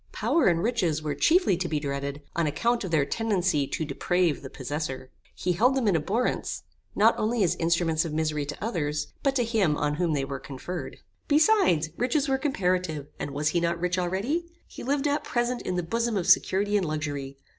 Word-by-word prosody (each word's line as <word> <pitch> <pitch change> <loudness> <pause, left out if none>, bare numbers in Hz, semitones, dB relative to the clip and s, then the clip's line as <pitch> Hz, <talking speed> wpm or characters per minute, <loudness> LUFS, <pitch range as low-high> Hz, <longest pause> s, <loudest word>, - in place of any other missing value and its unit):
Power 335 - +2
and 170 -1 +2
riches 180 -10 0
were 150 -1 -1
chiefly 325 - +3
to 180 0 -2
be 155 - 0
dreaded 140 0 -4
on 170 -2 +1
account 235 +11 0
of 190 - -4
their 155 -4 +2
tendency 185 -6 0
to 160 - -3
deprave 170 +3 0
the 135 - -8
possessor. 135 -1 -5 0.2
He 180 - -1
held 245 +9 +3
them 260 -5 +1
in 195 - +3
abhorrence, 200 +11 -1 0.3
not 220 +3 +5
only 220 0 +1
as 175 - +2
instruments 165 -1 +1
of 165 - -4
misery 155 -1 -1
to 145 - -6
others, 150 -9 -2
but 275 -1 +1
to 245 - +2
him 210 -10 +1
on 150 0 -1
whom 170 -2 +1
they 140 -2 0
were 135 -1 -5
conferred. 160 +8 -6 0.3
Besides, 295 - +3
riches 265 +4 +1
were 265 -1 +1
comparative, 180 - -1
and - - -3
was 145 +2 0
he 175 - +1
not 170 0 0
rich 180 +1 0
already? 205 - -1 0.2
He - - -11
lived 280 +2 0
at 290 +1 0
present 240 0 -1
in 185 - -3
the 180 - -1
bosom 230 +5 -1
of 180 - -1
security 205 +3 +3
and 185 -4 0
luxury. 145 -3 -4
175 Hz, 200 wpm, -27 LUFS, 150-230 Hz, 0.3 s, not